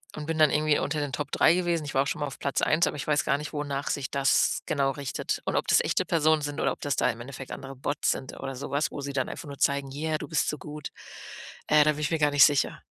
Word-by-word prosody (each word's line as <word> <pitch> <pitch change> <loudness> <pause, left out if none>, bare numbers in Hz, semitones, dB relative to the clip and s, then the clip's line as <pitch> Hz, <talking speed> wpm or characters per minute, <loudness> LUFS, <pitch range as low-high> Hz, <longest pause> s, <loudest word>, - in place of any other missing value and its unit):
und 150 - -6
bin 160 +1 -2
dann 155 -1 +6
irgendwie 150 0 +2
unter 150 +2 -2
den 145 -2 -3
Top 145 +3 -3
3 160 - +5
gewesen. 170 -3 0
Ich 145 - -6
war 135 - +3
auch - - -5
schon 160 - -3
mal 145 - 0
auf 140 - -9
Platz 140 - -1
1, 155 +3 +3
aber - - -3
ich 145 - -5
weiß 150 -1 +2
gar - - +1
nicht, 150 +1 -7
wonach 145 -1 -3
sich 140 -2 -2
das 140 -1 +2
genau 140 -3 +1
richtet 140 0 -4
und - - -1
ob - - 0
das - - +5
echte - - 0
Personen 155 -1 +2
sind 145 0 -4
oder - - +1
ob - - -7
das 145 - -1
da - - +2
im 115 - -4
Endeffekt 135 +1 -9
andere 135 0 -7
Bots 135 +2 -1
sind 130 - -5
oder 135 - -5
so 125 - -6
was, 145 +2 0
wo 145 - -6
sie 140 0 -5
dann 130 -2 -1
einfach 165 - -7
nur 140 -1 -9
zeigen: 140 -1 +1
„Yeah, 155 +2 -1
du - - -7
bist 160 - 0
so 150 - -3
gut.“ 150 +1 -8 0.8
Äh, 150 0 +6
da 155 - +3
bin 150 - -6
ich 150 - -1
mir 165 - +1
gar 150 -1 +3
nicht 145 -1 +8
sicher. 145 -2 +1
145 Hz, 295 wpm, -27 LUFS, 140-150 Hz, 0.8 s, nicht